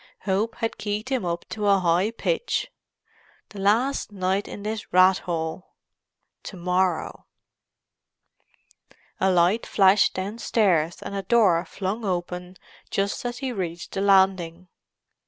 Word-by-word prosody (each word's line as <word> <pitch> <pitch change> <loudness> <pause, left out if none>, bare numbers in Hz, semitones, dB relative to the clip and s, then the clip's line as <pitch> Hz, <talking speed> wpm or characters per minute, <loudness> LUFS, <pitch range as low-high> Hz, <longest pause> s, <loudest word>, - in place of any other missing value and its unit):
Hope 205 +3 -1
had 225 - -3
keyed 210 +3 -3
him 260 -8 -1
up 170 0 -3
to 210 -1 -2
a 200 -1 +5
high 180 +2 +2
pitch. 475 - -2 0.8
The 205 - -10
last 225 +7 +1
night 190 0 -1
in 200 - -8
this 215 0 -5
rat 185 +1 +5
hole; 165 +1 -5 0.7
to 190 - -9
morrow——! 180 -1 -1 1.9
A 190 - +3
light 180 +5 +2
flashed 195 0 +4
downstairs 190 -4 0
and - - -6
a 200 - -2
door 190 -5 +3
flung 200 +4 -4
open 180 -1 -4 0.3
just 200 0 -1
as 240 0 -3
he 265 -1 -3
reached 175 -6 -5
the 195 - -3
landing. 190 -3 +2
190 Hz, 130 wpm, -24 LUFS, 180-210 Hz, 1.9 s, a